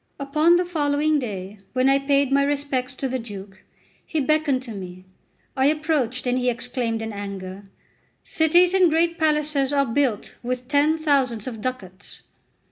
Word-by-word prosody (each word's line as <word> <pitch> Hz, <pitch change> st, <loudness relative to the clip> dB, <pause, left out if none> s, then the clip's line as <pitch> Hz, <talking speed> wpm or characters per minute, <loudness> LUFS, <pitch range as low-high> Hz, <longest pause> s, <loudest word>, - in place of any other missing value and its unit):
Upon 305 Hz, +5 st, +3 dB
the 355 Hz, +1 st, +2 dB
following 300 Hz, -2 st, +1 dB
day, 200 Hz, -4 st, -6 dB
when 255 Hz, +1 st, +2 dB
I 275 Hz, 0 st, +4 dB
paid 275 Hz, -1 st, +1 dB
my 280 Hz, 0 st, +4 dB
respects 280 Hz, -2 st, -1 dB
to 270 Hz, -, -3 dB
the 260 Hz, 0 st, -2 dB
Duke, 200 Hz, -4 st, -9 dB, 0.4 s
he 320 Hz, -, -2 dB
beckoned 290 Hz, -2 st, +1 dB
to 240 Hz, -, -8 dB
me. 185 Hz, -2 st, -8 dB, 0.5 s
I 265 Hz, 0 st, +3 dB
approached, 295 Hz, -5 st, 0 dB
and 250 Hz, 0 st, +1 dB
he 250 Hz, 0 st, +1 dB
exclaimed 235 Hz, -2 st, -2 dB
in 220 Hz, -1 st, -5 dB
anger: 200 Hz, -1 st, -7 dB, 0.6 s
"Cities 345 Hz, +3 st, +3 dB
and 370 Hz, -2 st, +5 dB
great 335 Hz, +2 st, +1 dB
palaces 300 Hz, -3 st, +1 dB
are 280 Hz, -1 st, +2 dB
built 240 Hz, -3 st, -1 dB
with 250 Hz, 0 st, -4 dB
ten 290 Hz, +3 st, +3 dB
thousands 270 Hz, -8 st, +1 dB
of 225 Hz, -4 st, -6 dB
ducats." 205 Hz, -7 st, -6 dB
270 Hz, 160 wpm, -23 LUFS, 230-300 Hz, 0.6 s, and